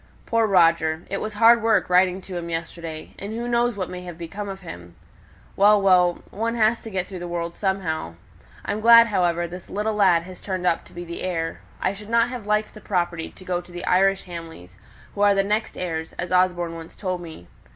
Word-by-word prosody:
Poor 230 -1 +2
Roger! 165 -3 +3
It - - -2
was 215 -1 -4
hard 230 +2 +6
work 220 -3 +2
writing 180 +1 +3
to 185 -1 -9
him 170 -1 -4
yesterday; 165 -1 -6
and 200 +2 -6
who 235 +1 -3
knows 240 -1 +1
what 190 -2 -3
may 180 0 -7
have 175 -2 -9
become 195 +5 -6
of 195 0 -7
him! 85 - -10 0.6
Well, 205 +1 +6
well! 180 -3 +3
one 230 +3 -2
has 225 0 +2
to 225 - -8
get 190 -3 -2
through 185 -1 -8
the 175 - -5
world 170 0 -3
somehow. 175 - -2 0.5
I'm 210 - -2
glad, 230 +1 +8
however, 175 -5 +1
this 180 +1 -10
little 210 +2 -1
lad 185 -5 +4
has 185 +1 -11
turned 185 -2 -3
up 170 - +1
to - - -17
be 175 0 -7
the 170 0 -7
heir. 165 -3 -3 0.2
I 190 - 0
shouldn't 210 +3 -2
have 245 -5 -7
liked 210 0 0
the 215 - -12
property 175 -4 -2
to 185 - -16
go 180 -1 -1
to 175 - -17
the 175 0 -6
Irish 195 +1 +3
Hamleys, 165 - -10 0.4
who 200 - -4
are 205 -1 +5
the 195 - +3
next 210 +3 -1
heirs, 160 -3 -4
as 175 0 -5
Osborne 180 -2 +2
once 165 0 -10
told 185 -3 -3
me. 160 - -10
185 Hz, 215 wpm, -23 LUFS, 170-205 Hz, 0.6 s, glad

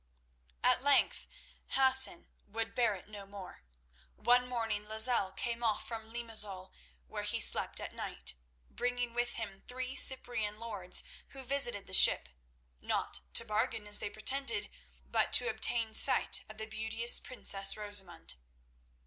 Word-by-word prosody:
At - - +1
length 285 -1 0 0.5
Hassan 265 -7 +5 0.2
would 225 +2 -6
bear 235 -4 -2
it 185 - -15
no 205 -2 -11
more. 200 -2 -13 0.5
One 250 +1 +1
morning 225 -4 -5
Lozelle 220 -2 +1
came 235 +4 -6
off 220 -2 -3
from 225 -1 -10
Limazol, 215 -5 +1 0.3
where - - -9
he - - -3
slept - - +4
at - - -10
night, - - -4 0.3
bringing 245 - -5
with 240 0 -3
him 200 -4 -9
three 255 +1 -7
Cyprian 225 -6 +1
lords, 205 -5 -5 0.3
who 270 -1 -10
visited 250 -6 +2
the 185 - -10
ship—not - - 0
to 230 - +3
bargain 215 0 -4
as 205 0 +1
they - - -6
pretended, 275 - 0 0.4
but - - -3
to - - +4
obtain 230 - +1
sight - - +4
of 215 - -13
the 220 - -7
beauteous 220 +2 +2
princess 195 -6 +2
Rosamund. 195 - -2
220 Hz, 140 wpm, -30 LUFS, 205-245 Hz, 0.5 s, Hassan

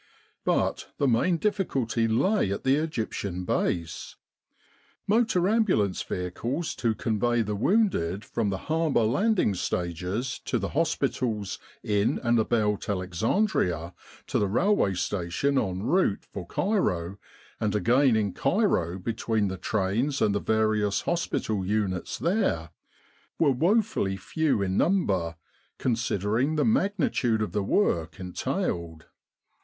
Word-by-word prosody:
But - - 0
the 140 - +2
main 135 +9 +2
difficulty 140 - 0
lay 120 - +2
at 100 - -3
the 130 +1 +4
Egyptian 110 - -3
Base. 85 -2 -2 0.9
Motor 210 -4 +2
ambulance 195 - +2
vehicles 120 - -3
to 115 -3 0
convey 115 +2 +1
the 105 0 -3
wounded 105 - +1
from 115 -3 -1
the 95 - -1
harbour 155 -6 +1
landing 175 - +2
stages 90 +7 -2
to 125 - 0
the 100 -3 -3
hospitals 125 - -1 0.2
in 105 0 +1
and 120 -1 +3
about 105 -2 0
Alexandria, 90 - 0 0.3
to - - 0
the 105 - +1
railway 120 - +2
station 100 +10 0
en 95 -3 -2
route 135 - +1
for 90 -3 -6
Cairo, 100 - -1 0.4
and 105 -1 0
again 120 +5 +4
in 105 -4 0
Cairo 95 - +1
between 110 +1 -1
the 95 - -4
trains 110 +10 0
and 105 - +2
the 100 - +1
various 110 -2 +1
hospital 110 - -1
units 95 -2 -1
there, 165 - 0 0.7
were 150 -4 +4
woefully 170 - +1
few 140 - 0
in 95 0 -1
number 95 - +1 0.4
considering 115 +3 0
the 150 - +2
magnitude 185 - +1
of 105 - -4
the 105 - 0
work 95 - 0
en 90 -1 -7
tailed. 80 -2 -3
110 Hz, 125 wpm, -27 LUFS, 95-155 Hz, 0.9 s, the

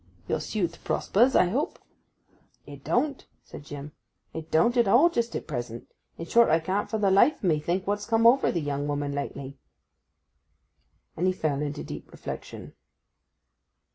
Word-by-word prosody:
'Your - - 0
suit 175 -6 -3
prospers, 245 +6 +2
I 180 - +5
hope?' 270 - -2 0.9
'It - - -11
don't,' 285 -3 -1 0.2
said - - -11
Jim. 145 0 -8 0.4
'It 160 0 -7
don't 200 +10 +3
at 240 -3 +3
all 270 - +5
just 235 -5 -1
at - - -4
present. 120 -5 -6 0.3
In 165 - -6
short, 235 +6 +4
I 160 - +4
can't 190 +5 -2
for 220 - -1
the 200 -2 +2
life 200 +11 +4
o' - - +3
me 155 -3 +2
think 175 +5 -2
what's 205 +1 -2
come 230 0 +2
over 250 +4 +5
the 170 - -1
young 145 0 -2
woman 145 -1 -2
lately.' 140 -1 -6 1.6
And 180 +3 0
he 185 - +2
fell 150 -5 -1
into 145 -1 -4
deep - - -9
reflection. - - -8
180 Hz, 170 wpm, -27 LUFS, 145-230 Hz, 1.6 s, I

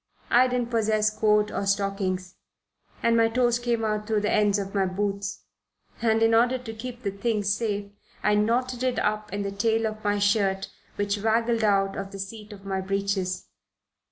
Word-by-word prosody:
I 250 +2 +6
didn't 250 -1 -1
possess 215 -2 +2
coat 210 -1 +3
or 200 - -2
stockings, 195 -2 -1 0.7
and 230 0 +4
my 225 0 +4
toes 240 0 +2
came 235 -2 0
out 210 -1 -1
through 215 -2 +1
the 210 - 0
ends 205 -1 +3
of 195 -1 -4
my 195 -2 +2
boots, 200 +1 -3 0.6
and 225 -1 +3
in 225 0 +4
order 245 +3 +4
to 240 -3 -8
keep 245 +2 -8
the 200 - -1
thing 210 +1 -1
safe 205 0 -1 0.3
I 210 - +3
knotted 240 +4 +1
it 255 -1 0
up 210 0 -1
in 200 0 -2
the 200 - -3
tail 225 +2 +1
of 215 0 -4
my 205 0 +1
shirt, 200 -1 +1 0.2
which 205 0 -1
waggled 225 +1 +1
out 195 -2 +2
of 195 0 -5
the 200 - -7
seat 210 +2 -7
of 200 -1 -12
my 190 -1 -2
breeches. 195 -1 -1
210 Hz, 185 wpm, -26 LUFS, 200-225 Hz, 0.7 s, I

